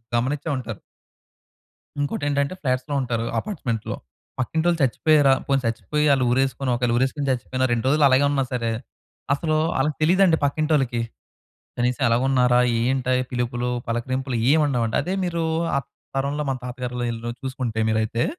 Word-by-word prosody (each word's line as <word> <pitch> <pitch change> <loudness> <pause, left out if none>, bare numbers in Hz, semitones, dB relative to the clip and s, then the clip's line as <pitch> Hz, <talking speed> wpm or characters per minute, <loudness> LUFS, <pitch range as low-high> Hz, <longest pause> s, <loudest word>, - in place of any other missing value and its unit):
గమనించే 140 +6 -1
ఉంటారు. 115 -5 -6 1.2
ఇంకోటేంటంటే 145 +1 0
ఫ్లాట్స్‌లో 130 +1 -1
ఉంటారు 115 -2 -2
అపార్ట్మెంట్స్‌లో. 125 - -3 0.4
పక్కింటోళ్ళు 165 +5 +1
చచ్చిపోయారా, 140 +1 +4
పోనీ 135 -1 +1
సచ్చిపోయి 150 +6 0
అళ్ళు 130 -2 +2
ఊరేసుకొని 130 0 0
ఒకవేళ 120 0 0
ఉరేసుకొని 135 +2 0
చచ్చిపోయిన 130 +1 -2
2 115 -1 0
రోజులు 150 +2 +3
అలాగే 130 +2 +4
ఉన్నా 135 -2 +1
సరే, 115 -2 -1 0.6
అసలు 155 +2 0 0.2
అళ్ళకి 150 +2 0
తెలీదండి. 175 0 +4
పక్కింటోళ్ళకి. 140 -5 +1 0.8
కనీసం 125 +3 0
ఎలాగున్నారా 125 +1 +3 0.2
ఏంట 130 +1 0 0.2
పిలుపులు 120 0 -1 0.2
పలకరింపులు 130 +2 -2 0.2
ఏం 160 - +5
ఉండవండి. 120 -5 0
అదే 185 - -3
మీరు 170 -2 -1 0.3
ఆ - - +3 0.4
తరంలో 140 +2 -1
మన 130 - -1
తాతగారు‌లు 125 0 -4
ఈలు 115 +1 -5
చూసుకుంటే 130 -4 -3
మీరైతే 110 +1 0
130 Hz, 130 wpm, -23 LUFS, 120-145 Hz, 1.2 s, ఏం